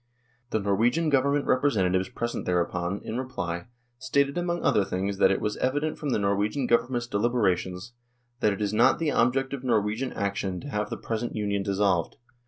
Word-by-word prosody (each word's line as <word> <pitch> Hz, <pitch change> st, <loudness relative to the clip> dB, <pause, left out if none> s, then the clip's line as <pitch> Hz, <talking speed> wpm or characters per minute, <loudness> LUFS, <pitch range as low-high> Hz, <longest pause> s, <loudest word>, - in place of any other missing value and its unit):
The 110 Hz, -, 0 dB
Norwegian 115 Hz, +11 st, +2 dB
Government 140 Hz, +1 st, +2 dB
representatives 95 Hz, -9 st, +2 dB
present 120 Hz, -1 st, -4 dB
thereupon, 90 Hz, +1 st, -1 dB
in 115 Hz, +3 st, -3 dB
reply, 90 Hz, -8 st, -4 dB, 0.3 s
stated 140 Hz, +1 st, +1 dB
among 175 Hz, 0 st, -1 dB
other 105 Hz, -, +3 dB
things 95 Hz, +1 st, -3 dB
that -, -, +6 dB
it 95 Hz, -, +1 dB
was 105 Hz, -1 st, -2 dB
evident 145 Hz, +4 st, -1 dB
from 150 Hz, -, -3 dB
the -, -, +2 dB
Norwegian 105 Hz, +6 st, 0 dB
Government's 120 Hz, 0 st, +1 dB
deliberations 100 Hz, -3 st, 0 dB, 0.2 s
" 120 Hz, 0 st, -45 dB
that 105 Hz, -, +3 dB
it 100 Hz, +2 st, -2 dB
is 100 Hz, 0 st, -1 dB
not 115 Hz, +3 st, +4 dB
the 160 Hz, -3 st, 0 dB
object 135 Hz, +2 st, +1 dB
of 135 Hz, -2 st, -5 dB
Norwegian 115 Hz, +1 st, 0 dB
action 100 Hz, -2 st, -2 dB
to 145 Hz, -, -8 dB
have 105 Hz, -4 st, -2 dB
the -, -, -4 dB
present 115 Hz, +1 st, -3 dB
Union 100 Hz, -2 st, -1 dB
dissolved. 100 Hz, -3 st, +1 dB
110 Hz, 180 wpm, -27 LUFS, 100-130 Hz, 0.3 s, that